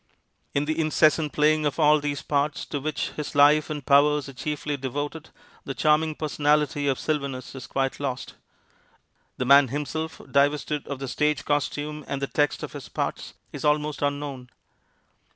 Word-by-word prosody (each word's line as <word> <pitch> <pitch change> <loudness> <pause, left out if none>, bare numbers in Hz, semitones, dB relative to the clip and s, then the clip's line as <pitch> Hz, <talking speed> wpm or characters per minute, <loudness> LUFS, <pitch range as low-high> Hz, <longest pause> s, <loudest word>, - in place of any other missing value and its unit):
In 140 +1 +1
the 155 +2 -2
incessant 155 -1 +3
playing 155 +1 +3
of 145 - -3
all 150 0 +5
these 145 -1 -3
parts 145 0 -1
to 145 - -4
which 155 +3 -2
his 150 -1 -6
life 145 +2 +5
and 150 -3 -5
powers 145 0 +4
are 135 - -9
chiefly 145 +2 -3
devoted 145 +4 -5 0.3
the 135 - -5
charming 155 0 +2
personality 150 -1 +1
of 135 -2 +1
Sylvanus 140 -4 -3
is 135 -2 -8
quite 135 -1 -1
lost. 135 -2 -4 1.0
The 125 - -1
man 140 +1 +7
himself, 150 +4 -4
divested 145 +1 +1
of 140 - -4
the 135 0 -5
stage 150 +2 0
costume 145 +1 -2
and 140 - -3
the 140 - -1
text 145 +1 0
of - - -6
his - - -8
parts, - - -4 0.2
is - - -6
almost 150 0 +1
unknown. 145 -3 -3
145 Hz, 165 wpm, -25 LUFS, 140-150 Hz, 1.0 s, man